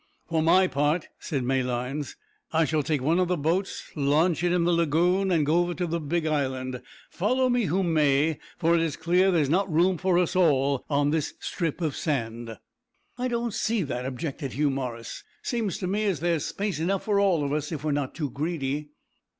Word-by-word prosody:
"For 165 -1 0
my 185 +4 +5
part," 150 0 0
said 135 -4 -3
Malines, 130 +2 -2 0.4
"I 160 0 +3
shall 155 0 +1
take 145 -2 -1
one 165 +6 +2
o' 185 - +3
the 180 0 0
boats, 170 +6 -2
launch 155 +4 +2
it 175 - +2
in 175 -1 +2
the 175 - +2
lagoon, 170 +4 +2
and 165 -5 +2
go 160 +4 +3
over 175 0 0
to 180 - -1
the 170 0 -2
big 160 +2 -1
island, 130 -4 -1 0.3
follow 255 +7 +1
me 245 -2 +2
who 190 +4 +1
may, 155 -2 +2 0.2
for 165 0 +2
it 170 - +3
is 160 -4 -1
clear 180 +3 +2
that 190 - +3
there's 150 -3 +2
not 185 +5 +1
room 175 +2 +3
for 185 -2 +2
us 180 -1 +1
all 140 -6 +3
on 145 0 +2
this 155 -2 -1
strip 170 -2 -3
of 155 -5 -1
sand." 115 -6 -3 0.6
"I 250 - 0
don't 235 -2 -2
see 220 -2 0
that," 125 -3 -3
objected 135 0 -4
Hugh 145 +2 +1
Morris. 125 -4 -5 0.2
"Seems 225 -7 -1
to 185 - -4
me 205 +4 0
as 190 -8 0
there's 165 -1 0
space 200 -6 -3
enough 185 +4 0
for 205 -2 +1
all 185 -6 +3
of 140 0 -1
us, 150 +1 -2
if 150 -3 -4
we're 155 - 0
not 140 -2 -2
too 150 -5 -3
greedy." 150 -1 -3
160 Hz, 205 wpm, -26 LUFS, 140-180 Hz, 0.6 s, my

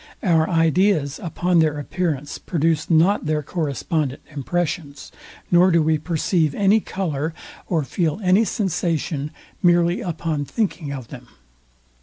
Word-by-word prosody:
Our 165 -4 +3
ideas 165 -2 +2
upon 175 +1 +1
their 155 -2 +2
appearance 150 -2 -3
produce 160 -2 0
not 170 +2 +3
their 155 -1 0
correspondent 150 -2 -2
impressions, 150 +1 -3 0.4
nor 175 +1 +6
do 170 -3 +3
we 155 0 +2
perceive 160 -1 0
any 205 +2 +4
colour, 160 -6 -3 0.3
or 165 -4 0
feel 160 +4 -1
any 185 +4 +4
sensation 170 - -1 0.3
merely 175 -1 +3
upon 165 -4 -2
thinking 180 -6 -2
of 130 -5 -7
them. 125 -3 -10
165 Hz, 125 wpm, -22 LUFS, 150-180 Hz, 0.4 s, nor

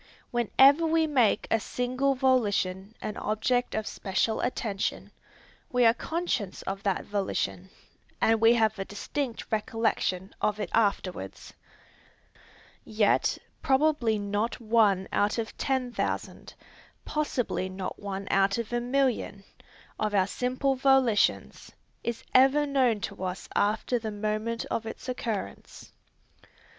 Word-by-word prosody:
Whenever 270 +6 +5
we 320 0 +3
make 255 -9 +2
any 225 - +3
single 255 +5 -1
volition 210 -6 +1
an 210 - -4
object 245 +4 0
of 220 -1 -1
special 205 +3 -1
attention, 215 -5 -2 0.6
we 250 -2 +3
are 225 - +6
conscious 275 - -3
of 195 0 -4
that 200 -2 -1
volition, 95 - -2 0.5
and 225 0 +3
we 230 +1 +6
have 220 -2 +1
a 195 - -2
distinct 240 +5 -4
recollection 215 -4 -1
of 210 0 0
it - - -4
afterwards. 185 - -1 1.3
Yet 215 -1 +2 0.2
probably 265 -5 +2
not 205 +4 -2
one 215 -5 +3
out 205 +3 +1
of 225 -1 -4
ten 260 -3 -1
thousand, - - -4 0.5
possibly 255 -10 -1
not 185 0 -6
one 195 -1 -5
out 195 +1 +3
of 235 0 -4
a 240 - +1
million, 250 -5 0 0.6
of 210 -1 0
our 190 -2 +4
simple 255 +6 -1
volitions, 265 -5 +2 0.3
is 235 -1 -3
ever 270 +3 +5
known 255 -7 +2
to 190 - -5
us 185 0 -4
after 215 +4 +1
the 220 -1 -4
moment 215 +2 -2
of 225 - -2
its 225 - -8
occurrence. 225 - -5
225 Hz, 125 wpm, -28 LUFS, 205-255 Hz, 1.3 s, are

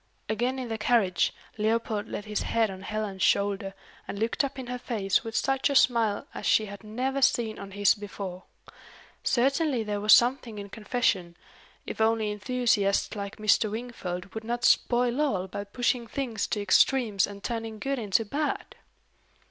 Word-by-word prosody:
Again 240 +5 -1
in 255 -2 -4
the 225 -1 -3
carriage, 210 -6 +2 0.3
Leopold 220 -1 0
laid 205 - -5
his 210 -1 -2
head 225 -3 +1
on 190 0 -9
Helen's 210 -2 -4
shoulder, 200 -1 +1 0.3
and - - -5
looked 225 +6 0
up 275 0 -4
in 260 - -5
her 250 0 -5
face 205 -6 0
with 225 -1 -6
such 270 +4 +1
a 280 - -1
smile 230 -5 +3
as - - -4
she 215 - +4
had 200 0 -10
never 255 +6 -2
seen 230 -4 +2
on 200 - -8
his 205 +1 +3
before. 200 -3 -7 0.8
Certainly 270 0 +2
there 205 -1 -3
was 210 +1 +3
something 240 -2 +3
in 200 0 -7
confession 200 -5 -1 0.5
if - - -5
only 220 -1 +2
enthusiasts 210 -2 +1
like 200 0 -5
Mr. 215 0 +3
Wingfold 200 -5 -5
would 220 - -5
not 240 +2 -2
spoil 245 +2 +3
all 195 -11 0
by 200 +2 -5
pushing 240 +3 -1
things 235 -5 -3
to 210 - -2
extremes 210 0 +3
and 200 -1 -10
turning 225 -2 -4
good 270 +4 -2
into 215 0 +1
bad! 295 +8 -3
220 Hz, 170 wpm, -27 LUFS, 200-245 Hz, 0.8 s, she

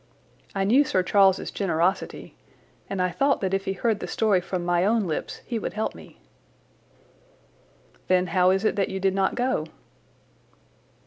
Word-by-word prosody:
I 195 - 0
knew 245 +9 +4
Sir 185 -9 0
Charles's 195 0 +3
generosity, 180 0 -1 0.5
and 195 - -3
I 180 0 +1
thought 275 +6 +1
that 190 -1 -1
if 195 0 -1
he 195 - -1
heard 215 +2 0
the - - -5
story 210 -5 +1
from 180 -1 -4
my 175 0 +2
own 215 +1 +2
lips 160 -3 -4
he 235 -3 -3
would - - -4
help 215 +1 -2
me." - - -14 1.9
"Then 185 0 +3
how 180 -1 +4
is 195 +3 +1
it - - +2
that 195 - +1
you 190 - -4
did 190 0 +1
not 195 0 0
go?" 250 +1 -1
195 Hz, 170 wpm, -25 LUFS, 185-215 Hz, 1.9 s, knew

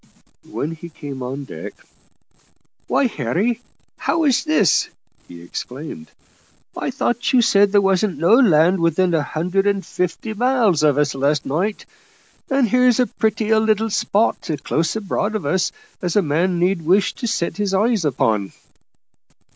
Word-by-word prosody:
When 140 +9 -3
he 165 +1 -9
came 145 -4 -8
on 135 +3 -5
deck 135 - -8 1.1
"Why, 280 - +2
Harry, 225 +1 -1 0.4
how's 310 -6 +1
this?" 310 - +2 0.4
he 85 -1 -12
exclaimed. 150 - -8 0.7
"I - - -3
thought 245 -2 -1
you 250 -2 +5
said 200 -2 +4
there 205 0 +4
wasn't 195 -1 +1
no 170 +7 +3
land 185 - +4
within 170 +2 +1
a 160 - +2
hundred 180 +7 -1
and 200 -3 0
fifty 180 +7 -3
mile 245 0 +2
of 150 -5 +2
us 145 -1 +1
last 140 +2 0
night, 185 +9 -2 0.6
and 270 -3 +2
here's 250 +1 +3
as 250 - +1
pretty 220 -1 0
a 220 - +5
little 220 0 +1
spot, 205 -1 0
close 165 +3 -1
aboard 215 0 -2
of 210 - -3
us, 185 +6 0 0.3
as 175 -2 -2
a 205 - +4
man 170 +4 0
need 180 +1 +1
wish 185 +4 +2
to 240 - -5
set 210 -6 -2
his 205 -2 -1
eyes 215 0 +1
upon." 110 -8 0
190 Hz, 155 wpm, -20 LUFS, 155-220 Hz, 1.1 s, you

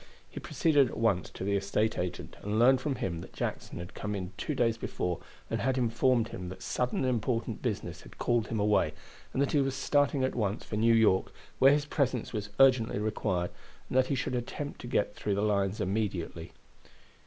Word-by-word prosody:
He - - -8
proceeded 145 -5 +3
at - - -7
once 105 -7 +1
to - - -7
the 100 +1 +1
estate 105 +3 +1
agent, 90 0 -4
and 105 +1 -2
learned 125 +3 +5
from 140 -1 -1
him 85 -7 -3
that - - -11
Jackson - - -4
had 85 +1 -7
come 105 -1 -4
in 95 0 -5
two 145 +8 -3
days 115 -3 +2
before 90 -5 -3 0.3
and - - -2
had 130 +1 +1
informed 120 0 +2
him 90 -1 -6
that 95 0 -9
sudden 125 0 -1
and 130 - +1
important 120 -1 -1
business - - -3
had - - -15
called 120 -2 +1
him 110 - -2
away, 100 -7 +2 0.4
and - - -3
that 140 - -1
he 145 - +3
was 135 -1 -1
starting 140 0 +2
at 130 - +1
once 105 -2 -1
for - - -5
New 115 +2 +4
York, 110 -4 +3 0.3
where 135 +1 +8
his 145 0 +2
presence 130 -6 -1
was 105 -2 -3
urgently 130 -5 +5
required, 100 -4 -1 0.4
and - - -4
that 130 0 +4
he 140 - 0
should 130 - -2
attempt 125 +4 -4
to - - -7
get 105 -4 0
through 100 - -1
the 100 - 0
lines 100 -1 +1
immediately. 95 -4 -2
110 Hz, 210 wpm, -30 LUFS, 100-130 Hz, 0.4 s, where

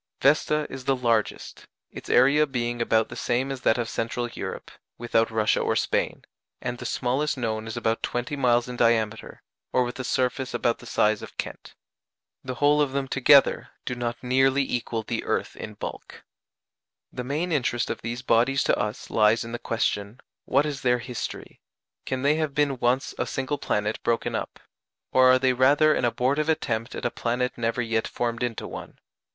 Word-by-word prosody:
Vesta 150 +1 +3
is 130 -1 -8
the 135 - +2
largest 115 -4 -1 0.2
its - - -9
area 140 +4 +5
being 120 -3 -2
about 110 -1 +2
the - - -8
same 130 +3 -1
as 135 -2 -5
that 110 - +3
of 120 -1 -1
Central 115 +1 -2
Europe, - - -6 0.3
without 115 -1 +1
Russia 110 -1 +2
or - - 0
Spain - - -1 0.4
and 120 -1 -4
the - - -4
smallest 140 +4 0
known 110 -3 -2
is 110 - -5
about 115 0 0
twenty 120 +4 -2
miles 120 -3 +2
in 125 - -6
diameter, 110 -2 0 0.3
or 125 - +3
with 120 +1 -5
a - - -2
surface 125 0 -1
about 120 -1 0
the 120 - -12
size 105 -1 +2
of - - -11
Kent. - - -6 0.7
The 130 -1 -5
whole 145 +2 +3
of 140 -2 0
them 140 -1 -1
together 135 +1 +4 0.2
do 125 - -2
not 120 -1 -3
nearly 135 +2 +3
equal 120 -3 -2
the - - -3
earth - - -2
in 105 - -8
bulk. - - -8 0.9
The 125 - -4
main 150 +7 -2
interest 125 -5 0
of - - -5
these 120 +2 -5
bodies 125 +3 +3
to - - +2
us 105 0 -4
lies 110 +1 +4
in 115 - -8
the 120 - -4
question, 110 0 -2 0.3
What 140 +3 +2
is 145 -3 -4
their 125 -1 +3
history? 120 0 -6 0.5
Can 130 0 -2
they 145 +2 +3
have 155 -3 -2
been 145 -3 +1
once 125 +3 +1
a - - 0
single 135 +2 -2
planet 105 -2 -1
broken 115 -1 0
up? - - -4 0.5
or 130 0 +6
are 130 - +6
they 130 0 +2
rather 145 +5 +4
an 125 - 0
abortive 135 +6 +1
attempt 120 -6 -1
at - - -5
a 120 - +1
planet 125 +1 -1
never 115 +1 -1
yet 115 -1 0
formed 120 0 -3
into 120 -2 -2
one? - - -9
125 Hz, 190 wpm, -25 LUFS, 115-135 Hz, 0.9 s, or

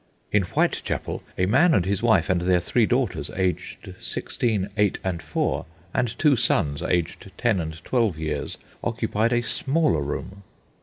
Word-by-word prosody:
In 105 - +4
Whitechapel - - -1 0.2
a 90 - +3
man 145 - +4
and 90 - +2
his 100 +1 0
wife 110 -8 +3
and 90 -2 +1
their 90 0 +3
three 110 +6 +2
daughters, 125 -5 0
aged 95 -1 -2
sixteen, 105 -5 -1
eight, 105 -3 +2
and 90 -3 -2
four, - - -1 0.3
and 120 -2 0
two 150 -3 +4
sons, 75 - +1
aged 85 -3 -1
ten 110 -5 +2
and 80 -1 -4
twelve 115 -9 +1
years, 75 -2 -3 0.3
occupied 110 +3 0
a 120 0 +2
smaller 135 - +1
room. 95 +7 -5
100 Hz, 155 wpm, -24 LUFS, 90-120 Hz, 0.3 s, In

